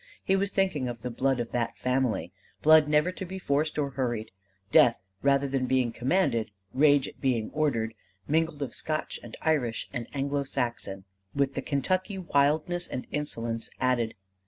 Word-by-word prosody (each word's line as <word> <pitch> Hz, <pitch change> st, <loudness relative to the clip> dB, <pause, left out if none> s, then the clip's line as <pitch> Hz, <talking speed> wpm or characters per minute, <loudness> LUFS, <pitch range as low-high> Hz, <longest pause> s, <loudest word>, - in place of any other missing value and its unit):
He 190 Hz, -, +2 dB
was 195 Hz, +1 st, +1 dB
thinking 190 Hz, -10 st, 0 dB
of 115 Hz, -1 st, -7 dB
the 125 Hz, -, -3 dB
blood 130 Hz, +2 st, +1 dB
of 120 Hz, -1 st, -3 dB
that 115 Hz, -1 st, -1 dB
family 125 Hz, -8 st, 0 dB, 0.3 s
blood 155 Hz, -1 st, +7 dB
never 150 Hz, +4 st, +3 dB
to 185 Hz, -, -7 dB
be 190 Hz, +1 st, -6 dB
forced 155 Hz, -3 st, 0 dB
or 140 Hz, -2 st, 0 dB
hurried: 120 Hz, -4 st, -2 dB, 0.4 s
death 115 Hz, -6 st, +5 dB, 0.2 s
rather 140 Hz, 0 st, +3 dB
than 135 Hz, -1 st, -1 dB
being 130 Hz, -2 st, +2 dB
commanded: 120 Hz, -, +1 dB, 0.2 s
rage 145 Hz, 0 st, +4 dB
at -, -, -12 dB
being 120 Hz, -5 st, 0 dB
ordered: 115 Hz, -8 st, 0 dB, 0.3 s
mingled 160 Hz, -1 st, +1 dB
of 130 Hz, -, -5 dB
Scotch 155 Hz, -1 st, -3 dB
and -, -, -10 dB
Irish 135 Hz, -8 st, +1 dB
and 120 Hz, -3 st, -3 dB
Anglo 140 Hz, 0 st, -1 dB
Saxon 120 Hz, -8 st, -3 dB, 0.3 s
with 140 Hz, -1 st, +1 dB
the -, -, -2 dB
Kentucky 185 Hz, +7 st, -1 dB
wildness 160 Hz, +1 st, +1 dB
and 125 Hz, -, -5 dB
insolence 115 Hz, -6 st, -3 dB
added. 125 Hz, -3 st, +1 dB
140 Hz, 165 wpm, -28 LUFS, 120-155 Hz, 0.4 s, blood